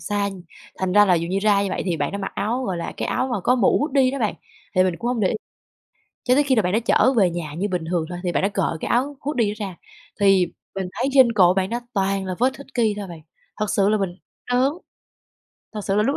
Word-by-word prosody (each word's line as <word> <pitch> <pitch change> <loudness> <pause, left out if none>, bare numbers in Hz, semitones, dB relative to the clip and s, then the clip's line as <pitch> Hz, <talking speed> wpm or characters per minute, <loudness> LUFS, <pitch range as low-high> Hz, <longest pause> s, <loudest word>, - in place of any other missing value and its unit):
xa, 205 -1 -1 0.5
thành 190 -1 -1
ra 205 +1 +7
là 185 -3 +4
dù 170 0 -1
như 190 - 0
ra 200 -1 +3
như 200 - -1
vậy - - -2
thì 175 -3 -1
bạn - - -2
đã 200 - -3
mặc 195 - -4
áo, 240 +5 -1
gọi 190 -5 -2
là, 170 - -4
cái - - -3
áo 260 - 0
mà 210 - -1
có 245 - +3
mũ 235 -6 +3
hoodie 270 -3 +2
đó 275 - -4
bạn, 215 -5 0 0.4
thì 185 - +5
mình 180 -2 0
cũng 240 - -3
hông 245 -2 -1
để 190 - +3
ý. - - -1 0.9
Cho 250 - +3
tới 290 +3 +4
khi 270 -2 +2
là 220 - +4
bạn 180 -1 -1
đó 220 - +3
chở 260 - +4
về 190 -5 +5
nhà 165 -3 -5
như 185 +6 -2
bình 180 -3 -2
thường 170 -2 0
thôi 175 -1 -5
thì 180 - 0
bạn - - 0
đã 195 - +2
cởi 195 -5 -1
cái - - -3
áo 270 +4 0
hoodie 270 -6 0
đó - - -3
ra 190 -3 -7 0.4
thì 195 -3 +4 0.3
mình 190 -1 -3
thấy 255 +3 -1
trên 260 -4 +6
cổ 180 -4 +5
bạn 190 0 0
đó 235 +1 -2
toàn 195 -1 0
là 185 -1 -3
vết 255 +2 +2
hickey 245 -6 -1
thôi 205 -2 -5
bạn, 170 -3 -10 0.4
thật 215 -1 -1
sự 200 0 +2
là 215 - +3
mình 190 -4 -3 0.4
đớn. 255 +3 +3 1.0
Thật 215 - -4
sự 195 - 0
là 210 - +4
lúc 275 +6 0
200 Hz, 275 wpm, -22 LUFS, 185-245 Hz, 1.0 s, ra